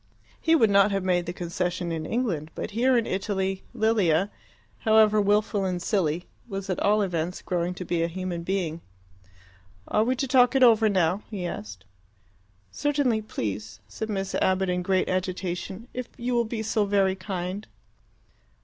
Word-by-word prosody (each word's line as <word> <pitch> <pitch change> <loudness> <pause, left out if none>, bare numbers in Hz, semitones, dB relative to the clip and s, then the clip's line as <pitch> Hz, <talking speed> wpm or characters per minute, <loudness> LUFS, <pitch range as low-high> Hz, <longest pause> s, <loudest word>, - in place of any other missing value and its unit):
He 330 0 +4
would 225 -9 +4
not 200 +1 +5
have 195 -2 -1
made 180 -2 +1
the - - -1
concession 175 0 -3
in 160 -1 -3
England; 195 -11 -1
but - - -4
here 245 +4 +3
in 230 - +1
Italy, 190 0 -2
Lilia, 200 -5 +2 0.5
however 215 -1 +5
wilful 205 0 +2
and 180 -2 -1
silly, 175 -3 0 0.2
was 195 -3 -4
at 185 - -2
all 210 +1 +3
events 175 -1 -2
growing 180 0 -1
to 180 - -6
be 170 -1 0
a 165 - +2
human 180 0 -4
being. 170 -3 -2 1.1
"Are 215 - +2
we 255 +3 +1
to 270 +2 -2
talk 250 0 +4
it 265 - +5
over 225 -2 +6
now?" 185 0 +1
he 200 -5 -4
asked. 100 - -6 0.9
"Certainly, 280 -6 +1
please," 105 - -5
said 220 - -5
Miss 195 -2 -2
Abbott, 190 0 +1
in 180 0 0
great 185 +1 +1
agitation. 185 +3 -3
"If 250 -1 -5
you 245 +1 -2
will 235 -1 +2
be 220 0 -4
so 220 -1 +1
very 195 -1 +2
kind." 190 +1 -5
195 Hz, 165 wpm, -26 LUFS, 175-220 Hz, 1.1 s, over